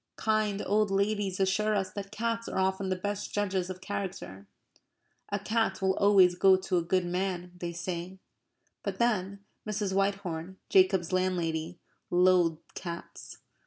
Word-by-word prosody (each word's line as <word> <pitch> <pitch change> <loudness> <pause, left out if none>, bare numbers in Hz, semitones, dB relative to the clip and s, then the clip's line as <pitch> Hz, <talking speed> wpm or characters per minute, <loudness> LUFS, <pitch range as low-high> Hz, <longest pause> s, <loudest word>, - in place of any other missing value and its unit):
Kind 215 -2 0
old 210 +1 +2
ladies 200 -1 0
assure 210 +3 +2
us 190 -2 -1
that 195 0 -6
cats 230 +1 -2
are - - -4
often 190 0 0
the 185 - +1
best 205 +2 -4
judges 190 -3 -1
of 185 0 -7
character. 185 - -5 0.8
A 200 - 0
cat 215 -1 0
will 190 0 +2
always 195 -3 +6
go 190 +2 +5
to 185 0 -1
a - - +2
good 175 +2 +1
man, 180 0 -2
they 175 -1 -3
say; 175 +1 -5 0.6
but - - -4
then, 200 -4 0 0.2
Mrs. 205 -2 -1
Whitehorn, 190 -3 -1
Jacob's 185 -2 +3
landlady, 175 -2 -1 0.3
loathed 175 -2 +3
cats. 170 -1 -8
190 Hz, 145 wpm, -29 LUFS, 180-200 Hz, 0.8 s, always